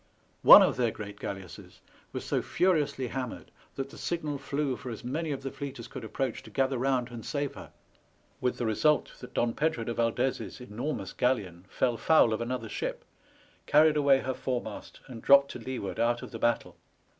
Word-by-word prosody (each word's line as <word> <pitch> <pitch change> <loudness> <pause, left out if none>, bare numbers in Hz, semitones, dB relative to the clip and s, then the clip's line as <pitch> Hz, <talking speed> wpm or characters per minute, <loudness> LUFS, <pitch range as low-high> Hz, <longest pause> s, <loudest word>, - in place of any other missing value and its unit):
One - - +11
of - - +1
their 120 -2 +2
great 100 -2 -8
galle 100 - -4
asses 90 -2 -13 0.3
was - - -5
so - - 0
furiously 145 -8 +1
hammered 125 -1 -5 0.2
that 135 0 -4
the - - -11
signal 155 -4 -2
flew 140 0 -1
for 125 - -8
as 115 - -7
many 150 +6 -2
of 135 -1 -4
the 135 - -4
fleet 140 -1 -6
as 115 - -8
could - - -8
approach 120 +3 -3
to - - -13
gather 130 +3 0
round 130 -1 0
and 115 -2 -8
save 145 +2 -2
her; - - -11 0.7
with 125 - -1
the 120 - -2
result 150 +8 +2
that 125 - -11
Don 120 -1 +1
Pedro 155 -6 0
de 115 - -3
Valdez's 120 +4 -1
enormous 120 -2 -4
galleon 100 -9 -1
fell 120 +3 0
foul 120 -2 +4
of 110 - -2
another 120 -1 -3
ship, - - -4 0.6
carried 155 +1 +5
away 140 -2 +4
her 130 - -2
foremast, 125 -5 -5
and 120 -4 -9
dropped 140 0 +6
to - - -7
leeward 115 -6 -5
out 120 +1 +1
of - - -8
the 115 - -7
battle. 120 +1 0
125 Hz, 195 wpm, -29 LUFS, 115-140 Hz, 0.7 s, One